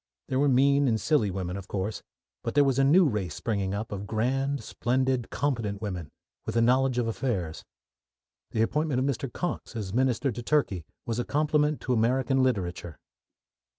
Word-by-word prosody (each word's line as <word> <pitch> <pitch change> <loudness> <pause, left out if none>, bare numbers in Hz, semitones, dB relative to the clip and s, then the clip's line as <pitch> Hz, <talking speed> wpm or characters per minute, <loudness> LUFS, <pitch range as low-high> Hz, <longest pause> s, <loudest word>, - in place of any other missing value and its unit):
There 130 - +1
were 145 0 +4
mean 140 +2 +4
and 110 -3 +2
silly 110 -1 +2
women, 90 -1 -3
of 100 0 -8
course, 100 +2 -3 0.4
but 115 +1 -3
there 145 - +6
was 135 -1 +2
a - - +5
new 165 +6 +6
race 105 -8 -2
springing 100 -3 -1
up 110 +2 -4
of 100 0 -5
grand, 135 +4 0
splendid, 130 +2 0
competent 115 -8 -1
women, 90 -7 -5 0.3
with - - -4
a 115 - +4
knowledge 130 +1 +3
of 120 -2 +1
affairs. 100 -9 -2 0.9
The 110 - +1
appointment 150 +1 0
of 130 - +1
Mr. 135 -1 -2
Cox 175 -5 -4
as 100 -4 -4
Minister 130 +2 +1
to 120 +2 -6
Turkey 115 - 0 0.2
was 115 0 -2
a - - +1
compliment 150 +1 +1
to 130 - 0
American 130 +3 +2
literature. 90 -10 -1
120 Hz, 180 wpm, -27 LUFS, 105-135 Hz, 0.9 s, there